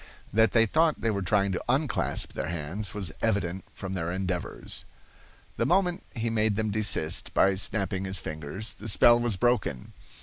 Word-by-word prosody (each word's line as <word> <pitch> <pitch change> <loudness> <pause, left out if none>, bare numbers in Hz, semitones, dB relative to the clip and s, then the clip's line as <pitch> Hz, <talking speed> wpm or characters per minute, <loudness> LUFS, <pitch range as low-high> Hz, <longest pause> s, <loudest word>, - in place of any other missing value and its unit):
That 110 -1 +4
they 115 -1 +4
thought 155 +7 +2
they 115 - +1
were 100 -1 -2
trying 100 +2 +2
to 90 - -3
unclasp 135 +3 +1
their - - -3
hands 85 +6 -4
was 95 -6 -1
evident 95 -5 -1
from 95 -1 -6
their 85 -2 -2
endeavors. 90 -1 -3 0.7
The - - +1
moment 180 -1 +2
he 115 -1 -1
made 110 -2 +1
them 110 0 -1
desist, 110 0 0
by 95 - +4
snapping 95 -1 -1
his 95 +1 +2
fingers, 80 +7 -4
the 110 - -9
spell 120 +2 +6
was 120 -5 -1
broken. 120 - 0
100 Hz, 170 wpm, -27 LUFS, 95-115 Hz, 0.7 s, spell